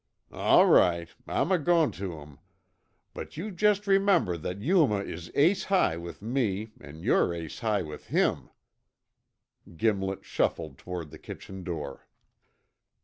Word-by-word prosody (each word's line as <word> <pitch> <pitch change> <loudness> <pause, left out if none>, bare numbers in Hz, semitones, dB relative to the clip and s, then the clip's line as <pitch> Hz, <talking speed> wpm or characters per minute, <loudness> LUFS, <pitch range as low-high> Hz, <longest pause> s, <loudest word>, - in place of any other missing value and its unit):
"All - - +5
right, 85 -2 +4 0.2
I'm 185 - 0
a 185 - +4
goin' 165 -1 +3
tuh 90 -5 -6
'em. 75 -1 -14 0.7
But - - -8
you 205 +6 -4
jest 205 +2 +2
remember 195 - +3
that 90 +4 -5
Yuma 140 - +3
is 85 -2 -7
ace 170 +7 +3
high 185 - +2
with 85 +3 -8
me 110 -3 -1
an' 75 +3 -11
yore 85 - +2
ace 80 -2 -7
high 110 -5 0
with 75 -2 -9
him." - - +1 1.3
Gimlet 95 -2 0
shuffled 80 -5 -1
toward 85 -4 -6
the - - -11
kitchen 95 -1 -9
door. 75 -6 -6
100 Hz, 140 wpm, -28 LUFS, -, 1.3 s, All